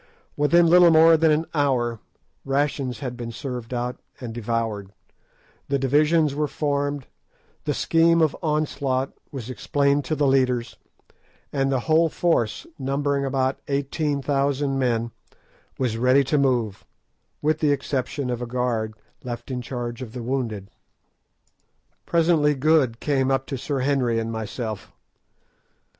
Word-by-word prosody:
Within 170 +4 +4
little 175 +1 +7
more 165 0 +7
than 160 0 +3
an 155 +2 +2
hour 125 -6 +1 0.4
rations 135 -1 -1
had 125 -3 -4
been 120 -1 -6
served 125 -2 -6
out 125 0 -3 0.2
and 120 -3 -6
devoured, 115 -3 -2 0.8
the 140 - +1
divisions 150 +3 +3
were 150 +1 0
formed, 145 -2 -2 0.6
the - - 0
scheme 165 0 +3
of 160 -3 +2
onslaught 140 -4 -1 0.2
was 130 -5 -6
explained 140 +2 +1
to 155 - -1
the 145 0 +1
leaders, 130 -3 +1 0.8
and 135 -1 +1
the 130 -2 +1
whole 160 +4 +3
force, 135 - 0
numbering 140 +1 0
about 135 0 0
18,000 140 -1 0
men, 120 -2 0 0.7
was 120 -4 -1
ready 130 +3 +4
to 135 +3 0
move, 120 -7 0 0.6
with 155 +1 +2
the 150 -2 +2
exception 140 -1 -2
of 120 0 -3
a 120 - -3
guard 115 -3 -1 0.3
left 120 +1 -6
in 125 -1 -3
charge 120 0 -5
of 115 -3 -7
the 125 -2 -6
wounded. 115 -6 -3 1.4
Presently 160 -3 +3
Good 135 -5 +2
came 135 -3 +1
up 135 0 +1
to 135 - -4
Sir 135 +1 -2
Henry 130 -4 +1
and 115 0 -2
myself. 110 -1 -5
135 Hz, 135 wpm, -24 LUFS, 120-145 Hz, 1.4 s, little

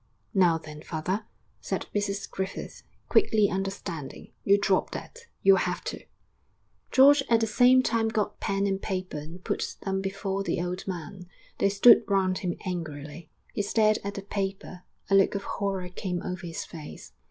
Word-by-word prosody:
'Now 180 -4 +4
then, 150 -1 -10
father,' 185 +8 -3 0.3
said - - -3
Mrs 200 -1 -1
Griffith, 190 0 -5 0.3
quickly 215 - +3
understanding, 190 -6 -5
'you 200 +1 +5
drop 195 -2 +1
that, 475 - -7 0.2
you'll 195 0 +7
have 180 0 -1
to.' - - -5 0.9
George 280 +2 +7
at 230 -1 +5
the 225 - +2
same 250 +4 +5
time 230 -2 +1
got 210 -2 -2
pen 195 0 0
and 195 -1 -1
paper 185 -5 -3
and 165 +5 -10
put - - -2
them 190 -1 -1
before 195 0 -2
the 195 - -1
old 180 +2 -4
man. 180 0 -6 0.3
They 200 - +3
stood 205 +4 +7
round 190 -2 +1
him 175 -2 -2
angrily. 155 -3 -5 0.2
He - - 0
stared 215 +1 +2
at 200 +1 -4
the 200 - -5
paper; 195 -2 -4 0.3
a - - -1
look 195 +1 +5
of 195 - -2
horror 195 -3 -3
came 180 0 -4
over 180 -1 -5
his 165 - -5
face. 155 -3 -10
195 Hz, 165 wpm, -27 LUFS, 180-200 Hz, 0.9 s, you'll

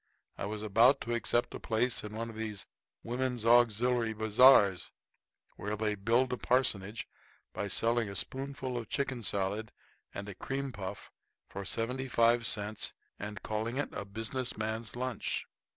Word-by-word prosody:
I - - -4
was 105 0 -5
about 115 +6 +5
to 120 - -2
accept 120 0 +2
a - - -6
place 115 +2 +1
in 105 0 -7
one 115 +1 -4
of - - -13
these 110 -3 -4 0.4
Women's 125 -1 -2
Auxiliary 120 0 +4
Bazars, 110 -3 +5 0.7
where 105 +1 -3
they 105 0 0
build 115 +6 +1
a - - -1
parsonage 115 -5 0 0.5
by 100 - -3
selling 115 +2 +1
a 100 - -7
spoonful 130 +1 -2
of 115 - -8
chicken 135 -3 -2
salad 100 +1 -1 0.4
and 100 0 -6
a 105 - -6
cream 135 +7 -4
puff 95 -5 -7 0.4
for 100 - -6
seventy 125 +6 -1
five 115 -1 +3
cents 105 +1 +1 0.3
and 105 0 -6
calling 110 +3 -2
it 145 - -1
a - - -4
Business 115 +5 -3
Man's 110 +1 -3
Lunch. 125 0 -2
115 Hz, 155 wpm, -32 LUFS, 105-125 Hz, 0.7 s, about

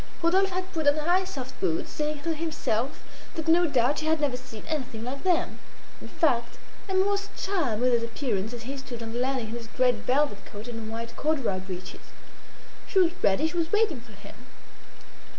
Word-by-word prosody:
Rodolphe 380 +4 +4
had 370 0 -3
put 315 -3 0
on 290 +1 +6
high 350 +5 +3
soft 260 -6 -6
boots, 165 -4 0
saying 300 -1 -2
to 330 - +1
himself 305 -6 -1 0.3
that 320 -1 -4
no 340 +2 +6
doubt 265 -1 +3
she 310 - -3
had 320 0 +3
never 290 -4 +1
seen 250 -4 -9
anything 260 -8 -3
like 260 +3 -4
them. 360 -3 +1 0.4
In - - -8
fact, 240 -7 +1 0.3
Emma 380 0 +4
was 405 0 0
charmed 285 - 0
with 250 -1 +4
his 235 - +4
appearance 230 -3 -2
as 240 -1 -6
he 270 +4 -4
stood 245 -3 -7
on 225 0 -5
the 240 - -2
landing 255 -3 0
in - - -5
his 235 -1 -6
great 250 +2 +3
velvet 255 -1 +1
coat 210 +3 -9
and 225 -2 -5
white 230 +1 -5
corduroy 275 -11 0
breeches. 185 -1 -7 0.9
She - - -2
was 355 -3 +6
ready; 200 +11 +4
she 345 +2 -4
was 330 -1 0
waiting 420 - +2
for 230 -2 -15
him. 205 +5 -13
265 Hz, 200 wpm, -28 LUFS, 230-320 Hz, 0.9 s, on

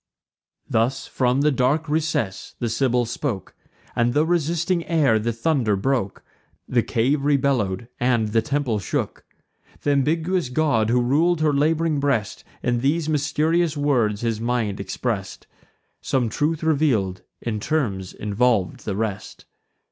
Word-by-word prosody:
Thus, 120 +4 0
from 130 +1 +1
the 150 +1 +3
dark 135 +5 +1
recess, 150 -11 -2
the 120 - -2
Sibyl 125 +1 +1
spoke, 120 - -4 0.4
And 120 +1 +1
the 150 +1 +4
resisting 170 +1 0
air 150 -9 +3
the 115 +2 -1
thunder 115 -2 +1
broke; 115 -1 -1 0.4
The - - +2
cave 135 +5 0
rebellow'd, 130 -8 +1
and 120 -3 +2
the 115 +1 +2
temple 130 -3 -1
shook. 95 - -3 0.6
Th' - - 0
ambiguous 160 +3 +1
god, 125 -6 +1
who 125 +1 +3
rul'd 155 +6 +2
her 155 -1 +3
lab'ring 155 +1 +1
breast, 135 -7 -1 0.2
In 120 -1 +1
these 150 +5 0
mysterious 155 +2 +1
words 120 -8 +1
his 115 -2 -1
mind 115 -4 -1
express'd; 100 0 -4 0.6
Some 125 -4 0
truths 150 +7 -1
reveal'd, 135 -13 +1 0.2
in 110 -3 -3
terms 105 -9 -1
involv'd 105 -3 0
the 100 - -2
rest. 105 -2 -4
130 Hz, 135 wpm, -23 LUFS, 110-150 Hz, 0.6 s, the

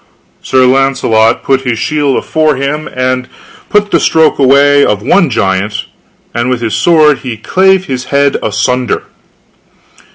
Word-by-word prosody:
Sir 130 -1 +1
Launcelot 125 -4 +1
put 135 -1 0
his 125 -3 -2
shield 145 0 -1
afore 155 -2 0
him, 140 +3 -3
and 130 0 -2 0.4
put 210 0 0
the - - +3
stroke 160 -2 +2
away 140 +1 +4
of 105 -1 0
the - - -12
one 180 -5 +2
giant, 100 -2 -2 0.5
and 120 +2 -2
with 125 -2 -2
his 115 -2 -3
sword 155 -4 +3
he 120 -4 -6
clave 190 - +1
his 130 -4 -5
head 140 +1 +1
asunder. 115 +3 -1
135 Hz, 150 wpm, -10 LUFS, 120-150 Hz, 0.5 s, away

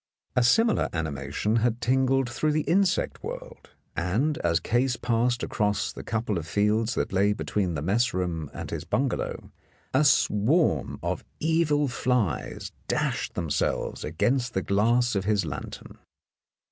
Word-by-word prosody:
A 125 - +4
similar 225 - +3
animation 80 - -1
had 115 0 +1
tingled 130 +1 +2
through 150 +5 0
the 155 0 +1
insect 190 +1 +1
world, - - -8 0.3
and 115 - 0
as 85 -1 +2
Case 125 +2 +1
passed 120 0 0
across 105 -1 0
the - - -7
couple 110 -4 -2
of 80 - -8
fields 105 +5 +1
that - - -2
lay 100 +2 +3
between 95 -4 -1
the 75 - -3
mess 115 +8 +2
room 85 -5 -2
and - - -7
his - - -3
bungalow, - - -2 0.4
a - - +4
swarm 115 - +2
of - - -2 0.2
evil 155 -2 +2
flies 125 - -1 0.2
dashed - - -1
themselves 80 -5 -1
against 120 - 0
the 95 - 0
glass 120 +5 +2
of 100 -2 -1
his 105 -3 +1
lantern. 70 -3 -7
115 Hz, 145 wpm, -26 LUFS, 95-130 Hz, 0.4 s, A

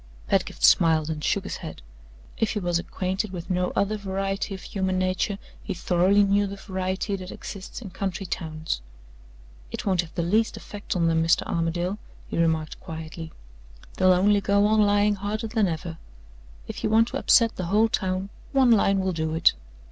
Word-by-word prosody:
Pedgift - - -1
smiled 160 -1 +5
and 150 -1 -5
shook - - +1
his - - -5
head. - - -9 0.5
If 225 - 0
he 210 - -1
was 175 -3 0
acquainted 190 +3 -3
with 180 0 -6
no 180 0 0
other 205 +2 +1
variety 195 0 -2
of 190 - -10
human 190 -2 -1
nature, 185 +2 0 0.2
he 195 - -4
thoroughly 185 +4 +3
knew 200 +1 +2
the 200 - -6
variety 190 +1 -3
that 185 -1 -8
exists 195 +5 -8
in 195 - -8
country 195 +1 -3
towns. 155 - -3 0.9
"It - - -6
won't 185 -3 +2
have 170 -2 -12
the 170 - 0
least 215 +6 +1
effect 205 -2 -6
on 170 -2 +2
them, 160 0 +2
Mr. 165 0 +3
Armadale," 175 +4 -1 0.3
he - - -5
remarked 160 -2 0
quietly. 160 0 -7 0.7
"They'll 185 0 +5
only 200 +3 +4
go 200 +1 +3
on 215 +1 +4
lying 205 0 +3
harder 210 +3 -3
than 220 -2 +1
ever. 165 0 -4 0.7
If - - -7
you - - +1
want 225 +2 +4
to 270 - -3
upset 230 -4 +4
the 185 - -3
whole 210 +5 +4
town, 190 -2 -1 0.2
one 265 -3 +5
line 195 -3 +4
will 190 -1 0
do 160 -1 -2
it. 165 - +5
190 Hz, 185 wpm, -25 LUFS, 170-205 Hz, 0.9 s, smiled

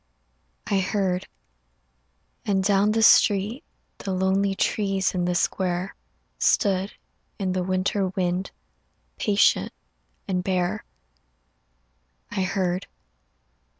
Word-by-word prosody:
I 200 - +1
heard, 190 -1 -1 1.2
and 195 -2 +1
down 200 +1 +3
the 225 0 +2
street 215 - +4 0.4
The 195 - -4
lonely 190 +1 +1
trees 195 -2 0
in 180 -2 0
the 180 0 0
square 180 0 -1 0.5
Stood 195 0 +2 0.4
in 190 -2 -1
the 185 - 0
winter 185 +2 0
wind 180 0 -1 0.7
Patient 205 0 +3 0.6
and 180 -2 -1
bare. 180 -1 -1 1.5
I - - -1
heard 185 0 -1
190 Hz, 95 wpm, -25 LUFS, 185-200 Hz, 1.5 s, street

